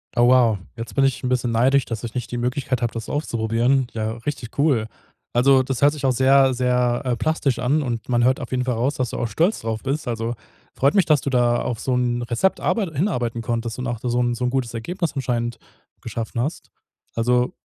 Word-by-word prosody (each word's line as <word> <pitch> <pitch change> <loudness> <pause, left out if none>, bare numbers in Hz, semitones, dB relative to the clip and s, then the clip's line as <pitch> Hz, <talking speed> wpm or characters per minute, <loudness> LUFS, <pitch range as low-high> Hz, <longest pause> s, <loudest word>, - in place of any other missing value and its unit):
Oh 120 0 +5
wow, 120 -5 +5 0.2
jetzt 115 -3 -7
bin 135 - +3
ich 135 - 0
'n 125 - -1
bisschen 125 -2 0
neidisch, 130 +4 +3
dass 115 -1 -5
ich 120 0 -6
nicht 120 -2 -4
die 120 - -3
Möglichkeit 125 +1 -1
habe, 120 - -1
das 115 -2 -6
auszuprobieren. 120 -1 +1
Ja, 110 0 -2
richtig 140 -5 -5
cool. 135 -7 +2 0.5
Also, 130 +2 +5
das 135 0 -3
hört 145 +1 +5
sich 145 -3 -4
auch 130 - +4
sehr 135 +1 +4
sehr, 125 -1 +1
äh, 125 - +1
plastisch 140 -5 0
an 140 +5 +1
und 120 -3 -4
man 120 -1 +2
hört 130 +2 +3
auf - - -6
jeden 125 -1 0
Fall 125 -2 0
raus, 125 +6 0
dass 125 -3 -1
du - - -4
auch 120 - -1
stolz 170 - +1
drauf 110 -1 -3
bist. 140 +1 -2
Als, 115 -2 -2 0.5
freut 140 +8 +2
mich, 195 - +4
dass 150 -4 +3
du - - -2
da 120 -2 +2
auf 115 -3 -3
so 130 - -1
'n 120 -1 0
Rezept 120 +11 0
arbei 215 -4 +1
hinarbeiten 135 - -1
konntest 115 0 -3
und 125 - -3
auch 120 -2 -3
da 125 - -3
so 120 +1 +1
'n 120 0 +1
so 125 +1 -2
'n - - +2
gutes 125 -3 -2
Ergebnis 170 +9 -3
anscheinend 120 -3 -2 0.4
geschaffen 115 +1 -5
hast. 145 +6 -4 0.4
Also, 125 +2 +1
125 Hz, 230 wpm, -22 LUFS, 120-135 Hz, 0.5 s, Oh